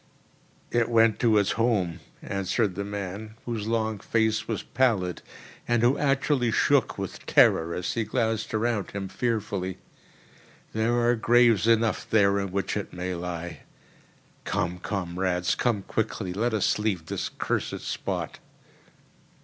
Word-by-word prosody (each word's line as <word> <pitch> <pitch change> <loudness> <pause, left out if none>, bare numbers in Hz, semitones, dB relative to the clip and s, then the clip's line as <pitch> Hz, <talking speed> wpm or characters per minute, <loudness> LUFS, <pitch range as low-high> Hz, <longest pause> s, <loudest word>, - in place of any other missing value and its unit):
"It 120 -1 +2
went 115 -2 +4
to 115 -3 +4
its 100 -2 +2
home," 110 -8 +1 0.2
answered 100 +1 0
the 100 - -3
man, 100 +2 -6
whose 115 -3 -3
long 110 -2 0
face 110 0 0
was 110 -3 -2
pallid, 110 -9 +1 0.5
and 120 -1 +2
who 125 +3 +4
actually 140 -3 +1
shook 115 - +2
with - - -6
terror 80 +1 +4
as 90 - -2
he 115 - 0
glanced 110 0 -1
around 110 -2 0
him 100 -1 -4
fearfully. 100 -5 -2 1.0
"There 115 +2 +1
are 120 - +4
graves 115 -2 +4
enough 115 -1 +2
there 100 -2 +4
in 100 -1 -3
which 100 +1 -1
it 105 - -4
may 90 +1 -4
lie. 85 0 -5 0.8
Come, 90 -3 -2
comrades—come 95 +3 -1
quickly! 110 -4 -2
Let 110 +4 0
us 105 - +1
leave 100 -6 -1
this - - -3
cursed - - -2
spot." - - -4
110 Hz, 135 wpm, -26 LUFS, 95-115 Hz, 1.0 s, went